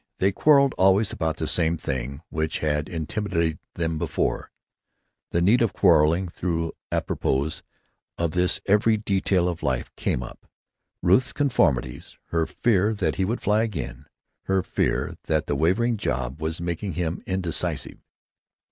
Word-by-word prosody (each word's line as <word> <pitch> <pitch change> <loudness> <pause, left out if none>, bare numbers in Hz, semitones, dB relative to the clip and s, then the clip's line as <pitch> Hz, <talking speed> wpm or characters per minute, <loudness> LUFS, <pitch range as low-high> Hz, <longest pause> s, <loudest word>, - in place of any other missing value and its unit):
" - - -57
They 95 +1 +2
quarreled 140 +4 +4
always 95 +3 +4
about 80 -3 -2
the 80 - -1
one 80 +1 +1
thing 70 0 -4
which 80 0 -2
had 75 -1 -1
intimidated 85 0 -2 0.2
them 80 -2 -1
before—the 85 - -5
need 110 +7 +4
of 115 -4 +2
quarreling; 85 0 +4
though 85 -2 -1 0.2
apropos 70 +4 -1 0.6
of 85 -2 0
this 90 +1 +2
every 105 +2 +3
detail 95 -3 +1
of 85 -2 -3
life 65 -2 -2
came 65 - -1
up: - - -11 0.6
Ruth's 95 +8 +3
conformities; 75 - 0
her 80 -1 0
fear 110 -1 +1
that 85 -6 -1
he 95 - +1
would 115 +5 -2
fly 105 +1 +2
again; 75 - -4 0.4
her 95 -1 +1
fear - - -1
that 80 -1 0
the 75 - -1
wavering 110 - +2
job 65 -6 -3
was 80 +1 -2
making 85 +3 -3
him 85 -1 -2
indecisive. 95 -4 -2
85 Hz, 145 wpm, -25 LUFS, 80-100 Hz, 0.6 s, quarreled